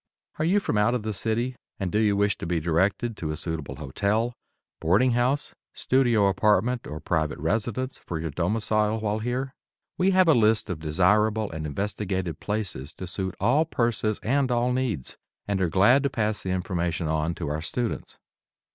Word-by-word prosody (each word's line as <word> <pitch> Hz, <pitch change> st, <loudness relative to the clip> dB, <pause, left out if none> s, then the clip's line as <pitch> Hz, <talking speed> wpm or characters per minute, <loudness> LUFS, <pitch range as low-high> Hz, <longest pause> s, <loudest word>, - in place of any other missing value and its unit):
Are 155 Hz, -, +1 dB
you 190 Hz, +5 st, +4 dB
from 110 Hz, -, 0 dB
out 105 Hz, +4 st, +3 dB
of 120 Hz, -, -2 dB
the 110 Hz, 0 st, -2 dB
city, 115 Hz, +5 st, -1 dB, 0.2 s
and 95 Hz, -4 st, -2 dB
do 105 Hz, -, +2 dB
you 105 Hz, -2 st, +3 dB
wish 100 Hz, -1 st, +2 dB
to -, -, -5 dB
be 85 Hz, -1 st, 0 dB
directed 95 Hz, +8 st, +1 dB
to 80 Hz, -, -4 dB
a 75 Hz, -, -3 dB
suitable 80 Hz, -3 st, -4 dB
hotel, 100 Hz, -, -1 dB, 0.5 s
boarding 100 Hz, +11 st, +3 dB
house, 125 Hz, +4 st, 0 dB, 0.2 s
studio 120 Hz, -5 st, +2 dB
apartment 105 Hz, +5 st, +2 dB
or 75 Hz, -, -6 dB
private 80 Hz, -2 st, -1 dB
residence 115 Hz, -, -2 dB
for 80 Hz, -, -5 dB
your 80 Hz, -1 st, -3 dB
domicile 110 Hz, +6 st, 0 dB
while 105 Hz, 0 st, -1 dB
here? 125 Hz, +4 st, -2 dB, 0.5 s
We 185 Hz, +1 st, +4 dB
have 185 Hz, -1 st, +4 dB
a 160 Hz, -, +7 dB
list 110 Hz, -3 st, +3 dB
of 85 Hz, -, -4 dB
desirable 105 Hz, +7 st, +2 dB
and 80 Hz, -1 st, -4 dB
investigated 95 Hz, 0 st, -3 dB
places 100 Hz, -10 st, -4 dB
to 95 Hz, -, -7 dB
suit 95 Hz, +1 st, -4 dB
all 125 Hz, +10 st, +3 dB
purses 115 Hz, -8 st, -1 dB
and 135 Hz, +3 st, +1 dB
all 125 Hz, 0 st, +1 dB
needs, 120 Hz, -, -2 dB, 0.3 s
and 100 Hz, -2 st, 0 dB
are 90 Hz, -, +2 dB
glad 105 Hz, +11 st, +5 dB
to 140 Hz, -, +1 dB
pass 110 Hz, -5 st, -1 dB
the 95 Hz, -, -5 dB
information 90 Hz, -3 st, -1 dB
on 80 Hz, +1 st, 0 dB
to 80 Hz, -5 st, -4 dB
our 75 Hz, +1 st, -2 dB
students. 120 Hz, +8 st, -3 dB
105 Hz, 180 wpm, -26 LUFS, 85-120 Hz, 0.5 s, a